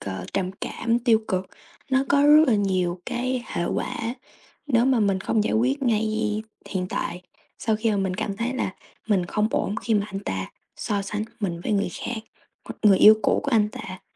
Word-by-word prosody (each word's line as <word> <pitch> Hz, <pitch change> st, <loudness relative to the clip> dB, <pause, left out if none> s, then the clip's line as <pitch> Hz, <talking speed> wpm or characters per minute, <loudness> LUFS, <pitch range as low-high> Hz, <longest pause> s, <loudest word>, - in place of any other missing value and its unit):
ờ, 95 Hz, -2 st, -5 dB
trầm 185 Hz, -2 st, -1 dB
cảm, 230 Hz, 0 st, -1 dB
tiêu 235 Hz, -2 st, +4 dB
cực, 185 Hz, 0 st, -1 dB, 0.4 s
nó 265 Hz, +1 st, +3 dB
có 280 Hz, 0 st, +4 dB
rất 300 Hz, +1 st, +8 dB
là 240 Hz, -, +4 dB
nhiều 185 Hz, -3 st, 0 dB
cái 250 Hz, 0 st, -2 dB
hệ 175 Hz, -, -2 dB
quả -, -, -2 dB, 0.7 s
nếu 240 Hz, -4 st, +3 dB
mà 260 Hz, -3 st, +3 dB
mình 195 Hz, -2 st, +1 dB
không 215 Hz, +1 st, +1 dB
giải -, -, 0 dB
quyết 265 Hz, +5 st, +1 dB
ngay 215 Hz, -2 st, 0 dB, 0.3 s
hiện 185 Hz, -2 st, -2 dB
tại. 180 Hz, 0 st, -3 dB, 0.4 s
Sau 220 Hz, -1 st, 0 dB
khi 220 Hz, 0 st, 0 dB
mà 205 Hz, -, +1 dB
mình 190 Hz, -2 st, -1 dB
cảm 195 Hz, +1 st, -3 dB
thấy 240 Hz, +3 st, -2 dB
là 200 Hz, -6 st, -2 dB, 0.3 s
mình 185 Hz, -4 st, +2 dB
không 210 Hz, +4 st, 0 dB
ổn 205 Hz, -, -1 dB
khi 225 Hz, -, 0 dB
mà 205 Hz, 0 st, +1 dB
anh 195 Hz, -1 st, -6 dB
ta 95 Hz, -, -4 dB, 0.3 s
so 205 Hz, -3 st, -2 dB
sánh 210 Hz, +2 st, -3 dB, 0.2 s
mình 175 Hz, -4 st, -2 dB
với 195 Hz, -, -2 dB
người 200 Hz, -1 st, +1 dB
khác, 240 Hz, -2 st, -3 dB, 0.4 s
hoặc -, -, -7 dB
người 200 Hz, -3 st, +6 dB
yêu 215 Hz, +1 st, +9 dB
cũ -, -, +2 dB
của 280 Hz, -, -1 dB
anh 215 Hz, -4 st, +3 dB
ta. 185 Hz, -3 st, -8 dB
210 Hz, 210 wpm, -24 LUFS, 190-235 Hz, 0.7 s, yêu